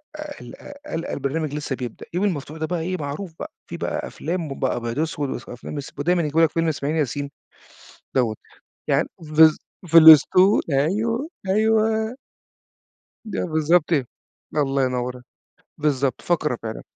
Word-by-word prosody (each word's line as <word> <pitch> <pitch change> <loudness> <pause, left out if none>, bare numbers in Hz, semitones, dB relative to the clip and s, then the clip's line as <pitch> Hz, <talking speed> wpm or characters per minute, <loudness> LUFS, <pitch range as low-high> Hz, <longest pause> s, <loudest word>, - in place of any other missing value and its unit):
أ 305 - -10
أ 295 -1 -8
القى 290 +1 -10
القى 165 - -4
البرنامج 145 +2 -2
لسّه 150 -2 -3
بيبدأ، 125 -3 -7
اليوم 180 +4 +1
المفتوح 155 -3 -4
ده 160 - -1
بقى 175 +1 -2
إيه 185 +3 -2
معروف 155 +4 -5
بقى، - - -7
في - - -6
بقى - - -3
أفلام 170 +1 -4
ب - - 0
أبيض 120 -2 -2
وأسوَد 155 -2 -1 0.2
وأفلام 125 +4 -8
إس 140 - -6
ب - - -18
ودايمًا 175 +4 +2
يجيبوا 155 +2 +1
لك 160 - +3
فيلم 165 0 0
إسماعيل 150 0 -1
ياسين 145 -1 -2 0.8
دَوَّة، 120 -5 +1 0.5
يعني - - +2
بالض 155 0 +5 0.3
في 165 0 +7
الأسطول، 165 +5 +7
أيوه، 220 - 0 0.2
أيوه. 220 +2 +2 1.2
ده - - -2
بالضبط 165 +1 +2
إيه، 140 -4 +2 0.5
الله 135 -2 +1
ينوّر 125 0 -3 0.6
بالضبط، 140 -4 0
فقرة 150 -7 0
فعلًا. 110 -1 -5
155 Hz, 155 wpm, -23 LUFS, 140-180 Hz, 1.2 s, في